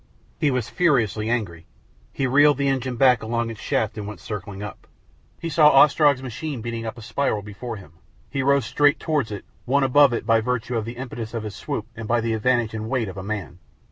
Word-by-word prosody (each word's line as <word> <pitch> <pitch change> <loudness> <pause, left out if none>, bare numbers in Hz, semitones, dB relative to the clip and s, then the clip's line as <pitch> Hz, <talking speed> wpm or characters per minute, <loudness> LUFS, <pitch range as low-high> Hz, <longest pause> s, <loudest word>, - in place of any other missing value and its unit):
He 150 - +3
was 125 -4 -1
furiously 115 - +1
angry. 90 -9 -2 0.4
He 135 - -2
reeled 145 +2 +5
the 140 0 0
engine 130 -2 -1
back 125 -2 +4
along 115 +1 -2
its 110 - -10
shaft 110 0 -1
and 100 - -5
went 105 -4 -8
circling 100 +1 -6
up. 105 - -9 0.5
He 170 - -4
saw 155 -2 +6
Ostrog's 140 -1 +5
machine 130 +1 -5
beating 115 -1 -4
up 110 - -6
a 115 - -10
spiral 120 -3 -1
before 110 +3 -7
him. 95 -7 -13 0.3
He 135 - -2
rose 140 0 +3
straight 145 -1 +3
towards 150 -9 -1
it, 100 - -6 0.2
won 140 +2 +3
above 140 +1 +5
it 115 - -2
by 115 0 +4
virtue 125 +1 -2
of 110 -2 -1
the 120 +1 -7
impetus 120 -3 -6
of 115 - -3
his 105 -2 -6
swoop 110 - -4
and 115 -1 -7
by 120 +1 +2
the 115 0 -1
advantage 115 0 +1
and 110 0 -4
weight 120 -5 -1
of 95 - -9
a - - -4
man. 95 -3 -5
115 Hz, 220 wpm, -23 LUFS, 110-135 Hz, 0.5 s, saw